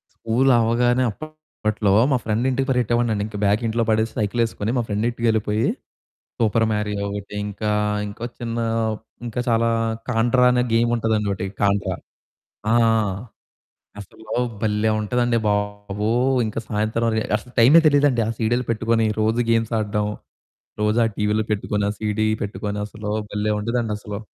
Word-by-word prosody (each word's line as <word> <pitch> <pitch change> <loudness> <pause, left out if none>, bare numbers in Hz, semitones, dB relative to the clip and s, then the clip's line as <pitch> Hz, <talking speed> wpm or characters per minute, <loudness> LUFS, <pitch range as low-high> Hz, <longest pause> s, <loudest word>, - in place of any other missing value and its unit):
స్కూలవ్వగానే 120 +1 +2
అప్పట్లో 110 -8 -3 0.2
మా - - +4
ఫ్రెండింటికి 125 +5 0
పరిగెట్టేవాడినండి. 120 -4 +1
ఇంక 105 - -8
బ్యాగ్ 105 +3 +2
ఇంట్లో 115 +1 0
పడేసి, 110 +1 +1
సైకిలేసుకొని 110 0 -1
మా - - +1
ఫ్రెండింటికెళ్ళిపోయి, 110 0 0 0.7
సూపర్ 115 0 +2
మారియో 105 -1 -2
ఒకటి, 100 0 -6
ఇంకా, 105 +1 -3 0.4
ఇంకో 105 +3 -6
చిన్నా, 115 -1 -2 0.6
ఇంకా 120 +2 -3
చాలా 115 0 +2 0.4
కాంట్రా 120 +2 +3
అనే 125 0 +2
గేముంటదండోకటి 110 -4 +1
కాంట్రా. 100 0 +1 0.8
ఆ! - - +4 1.3
అసలు 100 +3 -14 0.4
భలే 110 0 +1
ఉంటదండి 120 +2 +1
బాబూ. 105 0 -2 0.4
ఇంక 110 - -4
సాయంత్రం 110 +2 0
రె 110 - +1
అసలు 125 - -11
టైమే 135 +8 +7
తెలీదండి. 145 -4 +4
ఆ - - 0
సీడీలు 120 +2 0
పెట్టుకొని 115 0 +1 0.2
రోజూ 110 +2 +1
గేమ్స్ 115 0 +1
ఆడడం. 105 0 -1 0.8
రోజు 105 +2 +2
ఆ - - +3
టీవీలో 105 +1 +1
పెట్టుకొని, 105 -1 -1
ఆ - - -2
సీడీ 110 0 0 0.2
పెట్టుకొనసలూ 105 +1 -4 0.2
భలే 105 +1 0
ఉండేదండసలు. 105 -2 -3
110 Hz, 125 wpm, -22 LUFS, 105-120 Hz, 1.3 s, టైమే